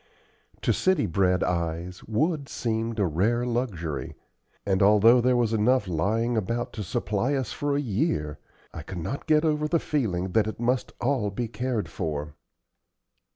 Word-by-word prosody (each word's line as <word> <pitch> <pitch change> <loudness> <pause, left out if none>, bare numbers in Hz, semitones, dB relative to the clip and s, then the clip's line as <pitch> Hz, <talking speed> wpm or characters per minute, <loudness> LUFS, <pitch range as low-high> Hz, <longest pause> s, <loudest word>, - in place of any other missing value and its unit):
To - - +3
city 185 0 +2
bred 90 +1 +2
eyes 85 +1 -2
wood 145 +6 0
seemed 115 0 -2
a 100 - +2
rare 105 +9 +1
luxury, 100 - -3 0.5
and 95 -1 +1
although 105 +4 +6
there 125 +1 +3
was 115 -2 +1
enough 110 0 +2
lying 110 +8 0
about 115 +3 -2
to 105 - -4
supply 105 +8 -1
us 130 -4 -2
for 145 -1 -1
a - - +1
year, 95 - -1 0.3
I 85 - -6
could 90 +5 -8
not 110 - -4
get 155 0 +4
over 150 -1 +1
the 170 - +2
feeling 105 - -1
that 110 +2 +2
it 110 - -5
must 125 +2 0
all 120 -5 +1
be 115 +4 -3
cared 120 -1 -2
for. 75 -4 -4
110 Hz, 160 wpm, -26 LUFS, 90-125 Hz, 0.5 s, although